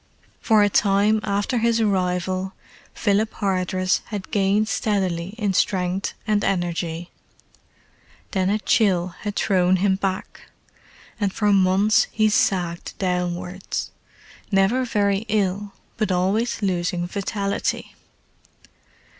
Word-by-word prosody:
For 215 -3 +4
a - - +4
time 205 +2 +3
after 205 +4 0
his 230 0 +2
arrival 185 -2 0 0.4
Philip 210 +2 0
Hardress 185 -1 0
had 205 -3 -6
gained 205 +1 +2
steadily 190 -4 -1
in 205 -4 0
strength 185 0 0
and 210 -2 +1
energy; 175 -2 -2 1.2
then 190 -2 +1
a 210 - +2
chill 195 -5 +2
had 205 -1 -4
thrown 185 -2 +2
him 190 +1 +2
back, 190 -1 -4 0.7
and 200 -2 0
for 210 0 +1
months 195 +2 +4
he 215 -1 +2
sagged 175 -5 0
downwards; 180 0 -3 0.6
never 200 +7 +3
very 205 -3 +1
ill, 200 -1 -1 0.2
but 215 -3 0
always 200 +6 0
losing 180 -2 0
vitality. 200 +2 -3
195 Hz, 110 wpm, -23 LUFS, 185-210 Hz, 1.2 s, For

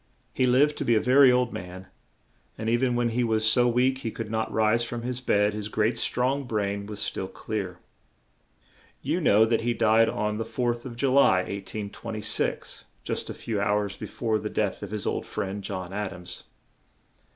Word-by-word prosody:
He 130 - +2
lived 140 +4 +3
to - - -1
be 120 - +3
a - - +4
ver 130 +5 +6
y - - +7
old 125 -1 +1
man, 90 +1 -7 0.7
and 110 - -4
e 115 - +3
ven 125 0 +1
when 120 0 +1
he 120 +2 0
was 110 -2 +1
so 120 +2 +4
weak 125 +2 +2
he 115 - -3
could 110 -1 -6
not 110 0 -1
rise 110 +2 +2
from 120 0 -4
his 125 +1 -3
bed, 105 -4 +2
his 105 -1 -4
great, 110 +2 +1
strong 130 +4 0
brain 100 -3 -2
was 105 -1 -6
still 95 - -2
clear. 95 -4 -5 1.3
You 160 +7 0
know 110 -7 +5
that 115 0 +1
he 120 +1 0
died 110 +1 +4
on 105 0 -2
the - - 0
4th 120 +1 -2
of 120 -2 -7
Ju 130 +2 +1
ly, 115 -9 +5
1826, 100 +3 -4 0.2
just - - -3
a - - -5
few 110 -3 -3
hours 100 -1 0
be - - -7
fore 110 -2 -1
the 105 +1 -4
death 105 -2 -1
of - - -6
his 105 -1 -4
old - - -2
friend, 100 +1 -4
John 95 -2 -5
Ad 105 -2 -3
ams. 90 -1 -9
110 Hz, 200 wpm, -26 LUFS, 105-120 Hz, 1.3 s, y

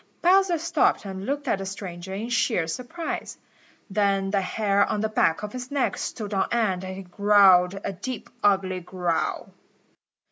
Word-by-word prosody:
Bowser 370 0 +4
stopped 325 -8 +1
and 190 +1 -6
looked 285 +1 -2
at 200 - +1
the 195 - -4
stranger 190 -2 -7
in 210 +5 -4
sheer 225 -7 +1
surprise. 250 - -5 0.5
Then 195 -1 +1
the 200 -1 +2
hair 200 +1 +1
on 205 - -1
the 220 - 0
back 165 -4 +1
of 210 - -5
his 250 0 -6
neck 285 -2 0
stood 210 -3 -5
on 195 - +1
end 205 -6 +1
and 185 0 -5
he 195 - -7
growled 195 -1 +4
a 200 - -3
deep, 230 +6 -6
ugly 190 -2 +2
growl. 180 -1 -2
200 Hz, 170 wpm, -25 LUFS, 190-235 Hz, 0.5 s, Bowser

